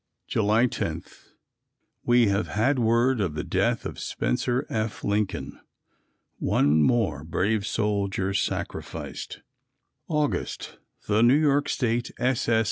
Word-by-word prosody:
July 110 +2 +3
10. 125 - -3 1.0
We 120 -1 +4
have 100 +1 0
had 125 +6 +1
word 120 +1 +2
of 85 -7 -1
the - - -2
death - - 0
of - - -5
Spencer 120 - -1
F. 110 -1 -3
Lincoln. 105 -1 -2 0.8
One 75 +2 +3
more 90 - +1
brave 100 +6 0
soldier 100 -3 -1
sacrificed. 95 - -4 0.7
August. 150 -3 -2 0.3
The 105 +1 +3
New 120 +4 +6
York 145 -2 +2
State 120 -2 0
S. 125 -2 0
S. 115 -1 +4
110 Hz, 120 wpm, -26 LUFS, 100-125 Hz, 1.0 s, New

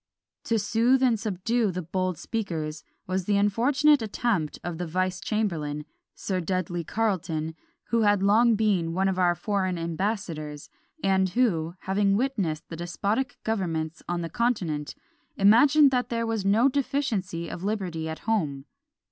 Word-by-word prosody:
To 230 - +1
soothe 230 +5 +2
and 235 -4 +3
subdue 220 +2 0
"the 180 0 -4
bold 185 +1 -2
speakers" 160 -9 -4 0.2
was 185 0 -2
the 205 0 +2
unfortunate 260 +8 +3
attempt 210 -7 -1
of 175 -1 -4
the 175 - -3
vice 185 +2 -1
chamberlain, 160 -9 -2 0.3
Sir 190 -2 -2
Dudley 175 -1 -2
Carleton, 170 -6 -1 0.4
who 230 -1 +2
had 205 -2 +3
long 225 +3 +5
been 195 -6 +1
one 190 +1 +2
of 190 -1 0
our 175 -1 +3
foreign 185 0 -1
ambassadors; 165 -4 -3 0.3
and 190 -1 +3
who, 175 -7 +1
having 195 +1 +2
witnessed 205 - -1
the 165 - -7
despotic 200 +9 -2
governments 165 -7 -2
on 175 0 -1
the 165 - -4
continent, 175 -12 -1 0.4
imagined 275 +8 +6
that 250 -1 0
there 230 -1 -1
was 225 -3 -1
no 215 +6 +4
deficiency 255 - -1
of 175 - -7
liberty 185 -6 -2
at 160 - -6
home. 155 -12 -1
195 Hz, 150 wpm, -26 LUFS, 170-225 Hz, 0.4 s, imagined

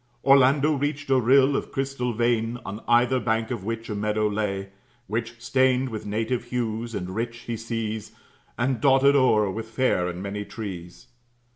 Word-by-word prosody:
Orlando 140 +2 +5
reached 145 0 -2
a 130 - +5
rill 135 +3 +4
of - - -3
crystal 135 -2 -2
vein, 115 0 0
On 100 +3 -6
either 120 +2 +4
bank 110 0 -1
of 115 -6 -4
which 115 +2 -4
a 110 - -4
meadow 105 +1 0
lay; 100 -2 -2 0.4
Which, 115 +2 -4
stained 130 +2 +2
with 110 -2 -6
native 115 +4 -2
hues 115 -2 -3
and 90 -1 -4
rich, 115 +2 -4
he 120 - -4
sees, 110 -1 -4 0.5
And 130 -1 0
dotted 140 +1 +5
o'er 110 -7 +3
with 110 +3 -5
fair 110 -6 +1
and 90 +1 -5
many 100 +1 -4
trees. 95 -6 -8
115 Hz, 165 wpm, -25 LUFS, 105-130 Hz, 0.5 s, Orlando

